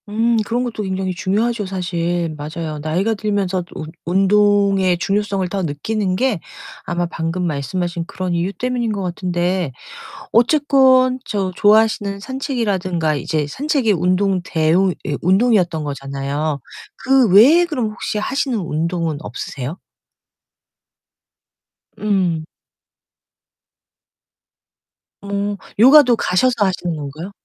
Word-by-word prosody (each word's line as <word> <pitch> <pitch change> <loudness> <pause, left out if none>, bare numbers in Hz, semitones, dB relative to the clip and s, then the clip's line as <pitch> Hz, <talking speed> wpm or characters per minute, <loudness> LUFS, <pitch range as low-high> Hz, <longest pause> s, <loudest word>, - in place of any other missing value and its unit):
음 230 +2 +1
그런 240 +2 0
것도 235 -3 -4
굉장히 190 -1 -2
중요하죠, 210 +4 -1
사실. 175 -3 -2
맞아요. 155 +1 -5
나이가 175 +9 0
들면서 200 -4 -1
운 155 0 -7
운동의 195 0 +3
중요성을 195 +1 -1
더 195 +1 -2
느끼는 185 +5 -2
게 245 -2 0 0.5
아마 175 0 -1
방금 170 +1 -3
말씀하신 170 +3 -3
그런 185 -1 -3
이유 170 +3 -1
때문인 245 0 -2
것 200 -2 -3
같은데 180 -2 -1 0.6
어쨌건 260 0 +4
저 195 -7 -2
좋아하시는 210 -1 +3
산책이라든가 200 - -2
이제 150 +1 -1
산책이 265 - 0
운동 185 +2 +1
대우 170 +3 +2
예 145 - -1
운동이었던 185 -4 +2
거잖아요. 140 +1 -3 0.4
그 265 -3 +3
외에 280 - +7
그럼 255 -10 -2
혹시 215 0 -4
하시는 260 +2 -1
운동은 165 -2 -2
없으세요? 145 0 -6 2.2
음. 185 -6 0 2.8
음 200 0 -2 0.2
요가도 260 +1 +7
가셔서 240 +4 +1
하시는 180 -3 -2
건가요? 155 +5 -7
190 Hz, 260 characters per minute, -19 LUFS, 170-220 Hz, 2.8 s, 외에